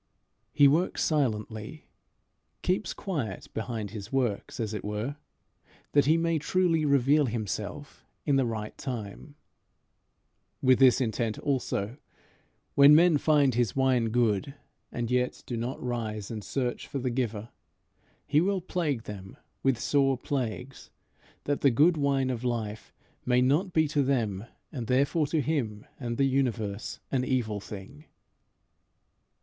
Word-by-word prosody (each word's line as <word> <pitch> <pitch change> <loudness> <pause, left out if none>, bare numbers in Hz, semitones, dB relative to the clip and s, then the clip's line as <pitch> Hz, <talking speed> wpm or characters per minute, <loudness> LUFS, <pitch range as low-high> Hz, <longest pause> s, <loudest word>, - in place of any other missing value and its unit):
He 145 - +6
works 160 +6 +1
silently 115 -2 -2 0.8
keeps 185 +3 0
quiet 140 - -4
behind 110 -3 -4
his 105 0 -8
works, 125 -6 -1
as 110 -2 -2
it 105 - -4
were, 105 +7 -3 0.8
that 145 -2 +4
he 160 +2 +5
may 165 -1 +1
truly 165 0 +1
reveal 140 +1 +4
himself 110 +5 -5 0.2
in 145 - +3
the 135 -2 +2
right 110 -2 -4
time. 125 +3 -6 1.2
With 130 -2 +4
this 130 -1 +6
intent 110 -2 -1
also, 125 -4 -2 0.8
when 140 +1 +8
men 165 -2 +5
find 145 -4 +3
his 120 -3 0
wine 130 -3 +3
good 115 +1 +1 0.4
and 120 0 -3
yet 125 0 0
do 120 - -4
not 120 +3 -3
rise 110 -4 -3
and 110 -2 -5
search 125 +4 -3
for - - -4
the 125 -1 -1
giver, 115 -3 -2 0.8
he 150 +1 +3
will 195 +2 +1
plague 160 -9 -2
them 95 -3 -9 0.2
with 135 -3 +2
sore 135 -1 +2
plagues, 125 0 -4 0.5
that 145 0 -1
the 140 - +5
good 150 +8 +4
wine 140 -3 +1
of 120 -1 -4
life 110 -4 -3 0.3
may 125 0 +3
not 145 +10 +2
be 160 -2 +3
to 145 -1 +1
them, 115 -7 0 0.3
and 120 -6 -5
therefore 140 +5 +2
to 155 +1 0
him 120 -8 -2
and 120 -3 -3
the 140 - +3
universe, 120 -6 -1
an 130 -2 +1
evil 120 -6 -1
thing. 105 +10 -10
125 Hz, 140 wpm, -28 LUFS, 110-145 Hz, 1.2 s, when